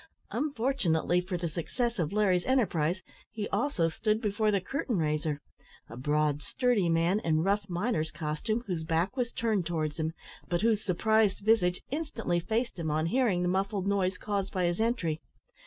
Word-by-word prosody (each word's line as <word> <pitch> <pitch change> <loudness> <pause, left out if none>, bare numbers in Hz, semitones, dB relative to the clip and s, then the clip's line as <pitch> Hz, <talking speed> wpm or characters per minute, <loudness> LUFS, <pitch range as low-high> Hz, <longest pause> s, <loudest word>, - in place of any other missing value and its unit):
Unfortunately 230 - +1
for 180 0 -3
the 170 0 -2
success 230 +8 -2
of 160 -3 0
Larry's 195 -4 +2
enterprise, 185 - +1 0.3
he 210 -2 -4
also 200 - +1
stood 215 +6 0
before 215 -1 +1
the 200 -2 +3
curtain 245 +2 -2
raiser 150 -2 0 0.5
a - - -8
broad, 150 +3 +1
sturdy 225 - +1
man, 165 +4 +2
in 160 -4 +1
rough 200 +1 +1
miner's 175 -3 0
costume 155 +9 -2
whose 175 -5 -2
back 165 +7 0
was 245 -3 -1
turned 215 -7 0
towards 155 -2 -2
him, 160 +1 -1 0.4
but 175 -1 +1
whose 220 -1 +2
surprised 205 +2 +2
visage 185 -5 +3
instantly 275 - -1
faced 220 +4 -2
him 160 -2 -2
on 155 +1 +1
hearing 195 -2 +2
the - - +1
muffled 195 +1 0
noise 195 -2 +1
caused 200 -2 -2
by 185 - 0
his 175 +4 0
entry. 175 -10 0
185 Hz, 170 wpm, -30 LUFS, 165-220 Hz, 0.5 s, the